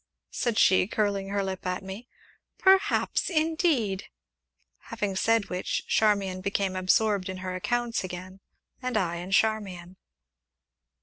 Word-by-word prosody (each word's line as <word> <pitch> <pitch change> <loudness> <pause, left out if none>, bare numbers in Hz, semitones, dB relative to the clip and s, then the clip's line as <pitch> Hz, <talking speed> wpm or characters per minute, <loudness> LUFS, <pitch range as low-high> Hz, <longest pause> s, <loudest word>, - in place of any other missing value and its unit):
said 235 -4 -1
she, 185 -3 +5
curling 200 -2 -1
her 200 0 0
lip 190 -1 -4
at 180 +1 -2
me, 195 +6 -8 0.5
"perhaps, 385 0 +3
indeed!" 310 - +1 0.8
Having 205 -4 -3
said 225 +1 +2
which, 180 0 -2
Charmian 200 -4 +2
became 195 -1 -1
absorbed 195 +1 +2
in 185 - -5
her 185 - -3
accounts 235 +4 -1
again, 185 +1 -7 0.4
and 250 -3 -1
I 170 -4 0
in 175 +2 -6
Charmian. 195 -4 0
200 Hz, 125 wpm, -27 LUFS, 185-225 Hz, 0.8 s, she